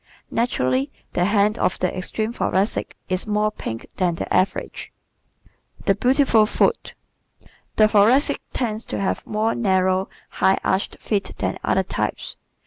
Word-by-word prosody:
Naturally 135 - 0 0.2
the 175 - +2
hand 205 +2 +2
of - - +1
the 180 - -1
extreme 215 +5 -2
Thoracic 200 -3 -1
is 185 +3 -2
more 210 0 +1
pink 115 - -6
than 180 -3 +1
the - - -4
average. 185 +1 -1 0.9
The 195 - +4
Beautiful 250 0 +3
Foot 465 - 0 0.5
¶ - - -22 0.3
The 215 - +6
Thoracic 230 +8 +4
tends 225 -3 -2
to - - -4
have 195 - -1
more 215 +2 0
narrow, 190 -3 +1 0.2
high 190 - +2
arched 190 +1 0
feet 205 -2 -2
than - - -2
other - - +2
types. - - -3
205 Hz, 140 wpm, -22 LUFS, 185-220 Hz, 0.9 s, The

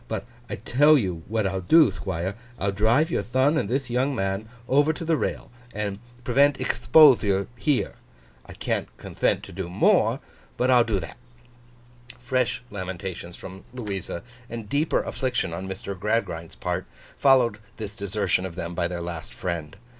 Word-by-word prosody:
But - - -3 0.2
I - - -2
tell 150 +4 +5
you 90 -9 -2
what 110 -1 0
I'll 95 -1 -1
do, 155 - +6
Thquire; 90 0 -3 0.2
I'll 100 +1 0
drive 115 - +3
your - - +1
thon 130 +5 +2
and 130 -10 0
thith 135 +1 -1
young 130 +3 0
man 95 +1 -2 0.2
over 145 +4 +4
to 165 +1 -6
the 165 0 +3
rail, - - -3 0.2
and 105 -2 -3 0.2
prevent 140 +4 +3
expothure 105 -11 +5
here. 140 +2 0 0.5
I - - -9
can't - - -2
conthent - - -1
to - - -10
do 90 0 -5
more, 90 - +3 0.4
but 125 +1 +2
I'll 125 -1 +6
do 110 -4 0
that.' 80 -3 -8 1.0
Fresh 125 0 -1
lamentations 95 -2 -6
from 95 +1 -10
Louisa, 100 -7 -4 0.3
and 115 -2 -6
deeper 145 +6 +1
affliction 125 -10 -2
on 95 +3 -5
Mr. 95 +1 -5
Gradgrind's 95 -5 -2
part, - - -3 0.3
followed 125 -6 +4 0.2
this 105 -2 -6
desertion 100 -3 0
of 95 -3 -5
them 85 -1 -4
by 85 0 0
their 85 0 -4
last 85 -2 -6
friend. 85 -2 -4
105 Hz, 160 wpm, -25 LUFS, 95-130 Hz, 1.0 s, do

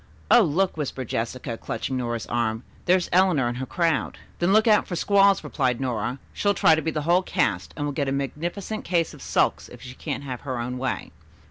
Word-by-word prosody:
"Oh, 240 - +8
look!" 180 0 +1
whispered 135 -4 -4
Jessica, 115 +1 -3
clutching 125 +4 -4
Nora's 120 -3 -2
arm. 115 -1 -1 0.2
"There's 180 0 +3
Eleanor 180 -8 +4
and 120 0 -3
her 130 0 -4
crowd." 165 -4 0 0.2
"Then 175 +2 +2
look 215 +2 +5
out 215 -2 +4
for 175 - -3
squalls," 200 +2 +4
replied 130 -4 0
Nora. 125 -1 -2 0.2
"She'll 200 -1 +1
try 160 - +5
to 160 - +2
be 160 - -1
the 155 -2 -2
whole 175 +4 +4
cast, 100 - -1
and 145 - -2
will 145 - -1
get 140 0 -1
a - - -1
magnificent 170 +10 -3
case 170 -2 0
of - - -13
sulks - - 0
if - - -12
she 125 - -9
can't 145 +1 -5
have 130 -3 -5
her 130 -3 -4
own 125 +1 -4
way." 130 -1 -3
145 Hz, 215 wpm, -25 LUFS, 125-175 Hz, 0.2 s, Oh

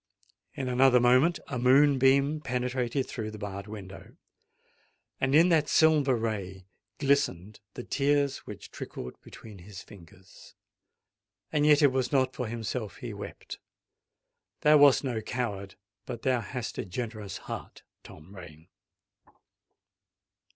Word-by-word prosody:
In 135 -4 -4
another 125 0 +4
moment 130 +8 +4
a 125 - -4
moonbeam 135 +2 +4
penetrated 125 0 -2
through 110 -3 -5
the 110 - -9
barred 100 -1 -7
window; 100 -2 -10 1.0
and 135 +1 +1
in 165 +3 +6
that 155 -3 +2
silver 150 -5 +4
ray 100 -5 -4 0.3
glistened 135 - 0 0.2
the 125 - -6
tears 140 0 0
which - - -10
trickled 60 - -8
between 105 -4 -13
his 95 +2 -11
fingers. 90 -1 -17 1.0
And 150 0 +2
yet 150 0 +5
it 140 - +6
was 130 -1 -1
not 130 -2 +2
for 125 - -4
himself 115 -1 -5
he - - -7
wept:—thou 150 0 -5
wast 145 -2 +6
no 120 -5 -2
coward—but 105 -1 -6
thou 130 -3 +1
hadst 120 +3 -6
a - - -3
generous 105 0 -6
heart, - - -8 0.2
Tom 85 +6 -14
Rain! 85 -2 -13
125 Hz, 125 wpm, -28 LUFS, 105-140 Hz, 1.0 s, in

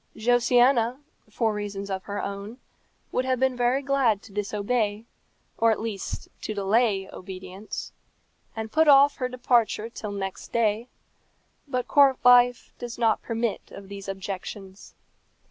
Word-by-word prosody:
Josiana, 245 +1 +3 0.3
for 220 0 0
reasons 200 -1 -5
of 190 0 -4
her 205 0 -4
own, 200 +4 -6 0.5
would 255 - 0
have 255 -1 0
been 260 -1 +2
very 245 +3 +1
glad 265 -7 +2
to 220 - -14
disobey, 210 +1 -1 0.5
or 230 - +4
at 220 - +1
least 215 -3 -5
to 215 - -4
delay 200 -1 +1
obedience, 190 +2 -8 0.6
and 220 -1 -5
put 315 0 +3
off 280 0 +6
her 255 -1 -2
departure 240 -3 +1
till 215 -3 -6
next 195 -1 -5
day; 225 0 +1 0.8
but 255 -3 -2
court 275 -2 +5
life 245 0 +5
does 240 -1 -6
not 225 -2 +2
permit 230 -1 -3
of 195 -1 -11
these 200 -1 -8
objections. 195 0 -7
225 Hz, 140 wpm, -26 LUFS, 200-245 Hz, 0.8 s, off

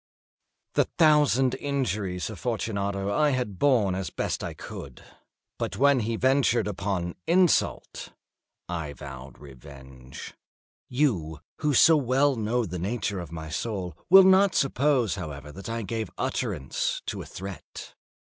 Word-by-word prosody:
The - - +3
thousand 150 -6 +4
injuries 105 -10 -2
of 105 - -9
Fortunato 100 -3 -2
I 150 +4 +3
had 105 -7 -4
borne 120 -10 +3
as 95 0 -3
I - - -29
best - - -2
could; 70 -3 -9 0.6
but - - -3
when 140 0 +4
he 115 0 -1
ventured 130 -2 +2
upon 95 -3 -2
insult, 180 0 +1 0.6
I 80 -4 -4
vowed 70 -2 -10
revenge. 65 -2 -12 0.6
You, 95 - 0 0.2
who 150 -3 0
so 165 +6 +7
well 135 +1 +2
know 115 +2 0
the 90 -1 -5
nature 100 +1 -2
of 85 - -8
my 80 -1 -7
soul, 95 -3 -3
will 190 +1 +10
not 190 0 +5
suppose, 135 -4 +2
however, 75 -3 -7
that 95 +8 -9
I 115 0 -3
gave 110 0 -3
utterance 65 - -2
to - - -4
a - - -8
threat. 95 0 -9
105 Hz, 135 wpm, -26 LUFS, 85-135 Hz, 0.6 s, will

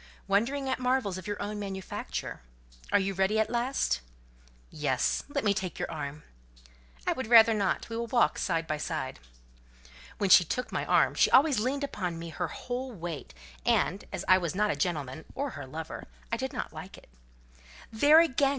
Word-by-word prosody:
"Wondering 245 +8 +1
at 260 - -1
marvels 250 -7 0
of 185 - -10
your 205 - -3
own 210 0 -4
manufacture. 190 - -5 0.5
Are - - +5
you 195 0 0
ready 195 +3 +1
at 220 +1 +1
last?" 240 - 0 0.7
"Yes; 145 -5 0
let 285 -1 -2
me 205 -2 +3
take 190 -3 -4
your - - -3
arm." 150 -1 -6 0.8
"I - - +2
would 260 -3 -4
rather 230 -1 +8
not: 200 -3 0
we 230 - -6
will 235 +1 -2
walk 240 +1 +2
side 165 -3 0
by 155 -1 -2
side." 150 -3 -4 1.0
When 195 -2 0
she 180 - +9
took 250 +9 -3
my - - -2
arm, - - +4
she - - +4
always 275 -2 +5
leaned 265 +5 -1
upon 180 -11 -3
me 165 0 -6
her 175 +2 -3
whole 250 - -5
weight; 170 - -7 0.3
and, 195 - +1
as - - -4
I 185 0 +6
was 175 -1 -3
not 210 +1 +2
a - - -1
gentleman, 155 -5 -2
or 280 0 -2
her 145 - -8
lover, 160 +4 -7 0.2
I - - +1
did - - -3
not - - -5
like - - -9
it. - - -17 0.9
"There, 290 +8 +7
again!" 280 -4 +2
200 Hz, 185 wpm, -29 LUFS, 165-245 Hz, 1.0 s, she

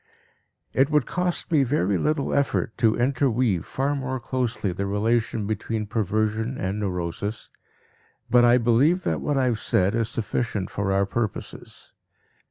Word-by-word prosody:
It 135 +2 +3
would 150 -4 +2
cost 180 -1 -2
me 155 -3 +4
very 115 -7 +1
little 145 - 0
effort 140 -5 0
to 115 -3 +3
interweave 120 - +1
far 140 +2 -1
more 130 -1 -3
closely 125 -6 -2
the 100 +3 -3
relation 110 +1 0
between 110 +1 -2
perversion 110 +3 -1
and 95 +3 -2
neurosis, 95 +2 -3 0.8
but 120 +1 +5
I 120 +1 +6
believe 125 +10 +3
that - - -1
what 145 -2 0
I 135 - +2
have 120 -3 +1
said 95 0 +1
is 115 -1 0
sufficient 110 -3 -2
for 100 -1 -1
our 100 0 +2
purposes. 110 +2 -5
115 Hz, 150 wpm, -24 LUFS, 105-130 Hz, 0.8 s, I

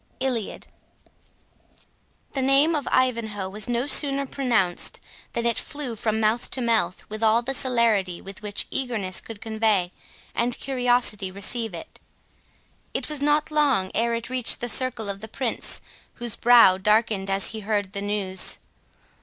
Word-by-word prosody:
ILIAD 255 -5 -2 1.7
The 270 - -2
name 275 +5 +4
of 295 -3 -2
Ivanhoe 225 -6 +1
was 210 +4 -2
no 240 +1 0
sooner 280 -1 +3
pronounced 235 -10 0 0.3
than 235 -1 -2
it 235 -1 +2
flew 285 -5 -5
from 220 0 -1
mouth 220 +2 +1
to - - -1
mouth, 225 -7 0
with 215 +1 -7
all 225 +1 +4
the 270 +3 -2
celerity 230 -9 +1
with 195 0 -10
which 205 -1 -3
eagerness 220 -8 -2
could 225 -2 -10
convey 220 -5 +1 0.4
and 240 +1 +1
curiosity 245 -6 +1
receive 200 +2 -3
it. 165 - -10 1.0
It - - -2
was 300 -2 -4
not 295 +1 +2
long 275 -11 +2
ere 235 +1 +1
it 230 0 -4
reached 255 -2 +3
the 240 - -2
circle 245 -3 -1
of 200 0 -3
the 220 - -7
Prince, 235 +1 -2 0.3
whose 240 -2 -1
brow 230 -6 +6
darkened 210 -1 +2
as 195 0 +1
he 220 - -6
heard 205 -2 -2
the 200 - -2
news. 200 -2 0
230 Hz, 155 wpm, -24 LUFS, 205-255 Hz, 1.7 s, brow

